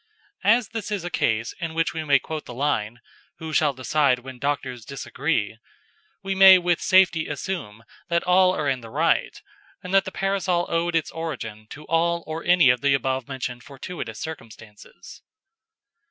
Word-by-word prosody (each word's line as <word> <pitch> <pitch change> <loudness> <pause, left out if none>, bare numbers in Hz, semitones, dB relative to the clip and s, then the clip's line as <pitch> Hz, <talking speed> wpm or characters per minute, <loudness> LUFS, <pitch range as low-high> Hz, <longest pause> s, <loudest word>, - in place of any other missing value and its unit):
As 225 0 +3
this 220 -2 -5
is 205 -4 -3
a 175 - -5
case 115 -4 0
in 165 -3 -4
which 165 0 0
we 160 -1 -4
may 145 -2 +4
quote 155 +2 -6
the 120 - -9
line 120 -4 -1 0.4
"Who 160 -1 -7
shall 150 -1 +3
decide 135 0 +2
when 125 0 -11
doctors 130 -3 -3
disagree?" 135 -4 -3 0.6
we 195 0 -2
may 190 -1 +9
with 175 -1 0
safety 185 -4 +4
assume 140 - -5 0.3
that 170 0 +1
all 185 +1 +4
are 150 - -2
in 130 -2 0
the 115 - -11
right, - - 0 0.4
and 180 +1 -6
that 195 0 +4
the - - -5
Parasol 195 -3 0
owed 170 0 0
its 165 - 0
origin 115 -10 -6
to 150 +1 -10
all 170 +1 +1
or 160 +1 -5
any 175 -7 +5
of 125 - -2
the 140 -1 +3
above 130 -2 -2
mentioned 125 -2 -5
fortuitous 135 - -8
circumstances. 110 -9 -11
155 Hz, 170 wpm, -24 LUFS, 125-175 Hz, 0.6 s, may